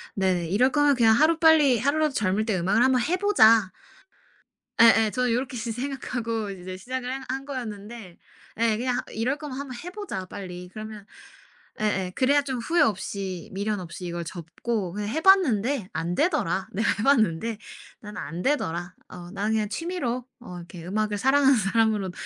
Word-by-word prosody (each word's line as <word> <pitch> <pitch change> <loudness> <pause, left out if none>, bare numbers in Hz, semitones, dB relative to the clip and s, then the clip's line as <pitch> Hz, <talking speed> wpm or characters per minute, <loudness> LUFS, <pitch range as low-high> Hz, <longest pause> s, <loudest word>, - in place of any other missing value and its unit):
네네 185 -3 0
'이럴 250 +8 +3
거면 290 -1 +3
그냥 225 -3 +5
하루 310 +6 +4
빨리 305 -6 +5
하루라도 295 +4 +1
젊을 210 -2 0
때 215 -5 0
음악을 200 +7 +2
한번 260 -1 +3
해 340 +9 0
보자.' 225 - +5 1.1
예예, 225 -2 +6
저는 250 0 0
요렇게 250 +2 -2
시 230 0 -3
생각하고 240 -4 -3
이제 185 -1 -8
시작을 250 +5 -5
한 265 0 -5
한 270 +1 -3
거였는데. 220 -7 -7 0.4
예 230 -2 +2
그냥 245 +1 -1
하 - - -5
'이럴 245 +6 -1
거면 290 -4 -6
한번 275 -3 -6
해 355 - -6
보자, 380 - -5
빨리.' 180 -2 -8
그러면 215 -1 -8 0.8
예예 195 -4 0
그래야 280 +3 +3
좀 265 -3 -3
후회 330 +8 +1
없이 195 - -2
미련 205 +1 -2
없이 180 +1 -8
이걸 170 0 -4
접고 180 +4 -4
그냥 205 +1 -4
'해 315 +8 -2
봤는데 275 - +3
안 165 +2 -2
되더라. 290 - 0
내가 215 +4 0
해 - - -1
봤는데. 225 -5 +2 0.4
난 210 0 -10
안 170 +2 -5
되더라. 175 - -1 0.2
어 175 -1 -10
나는 205 +2 -1
그냥 215 -2 0
취미로 255 - -3
어 180 -7 -9
이렇게 170 -1 -10
음악을 210 +2 -1
사랑하는 270 +1 +4
사람으로 210 -1 +1
225 Hz, 350 characters per minute, -25 LUFS, 190-265 Hz, 1.1 s, 예예